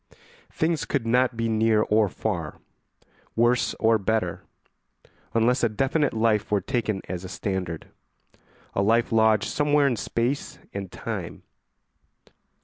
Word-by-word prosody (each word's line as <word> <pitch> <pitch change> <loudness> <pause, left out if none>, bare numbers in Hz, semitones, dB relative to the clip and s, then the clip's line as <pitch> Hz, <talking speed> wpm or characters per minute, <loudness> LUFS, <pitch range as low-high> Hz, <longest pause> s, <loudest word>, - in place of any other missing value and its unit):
Things 160 -1 0
could 135 -5 -2
not 125 +1 +2
be 115 0 0
near 110 -1 +3
or 105 -1 +2
far, - - -3 0.8
worse 120 +2 +2
or 110 0 +3
better, 100 -4 -1 0.9
unless 120 +3 +3
a 115 - +4
definite 135 +5 0
life 110 -2 +1
were 105 - +2
taken 110 -5 -2
as 90 0 -5
a 95 - -7
standard, 95 -4 -4 0.9
a - - +1
life 115 +4 +2
lodged 110 -2 +3
somewhere 145 0 +2
in 130 -3 +2
space 120 +5 -2 0.2
and 100 -2 -5
time. - - -6
115 Hz, 130 wpm, -25 LUFS, 105-125 Hz, 0.9 s, a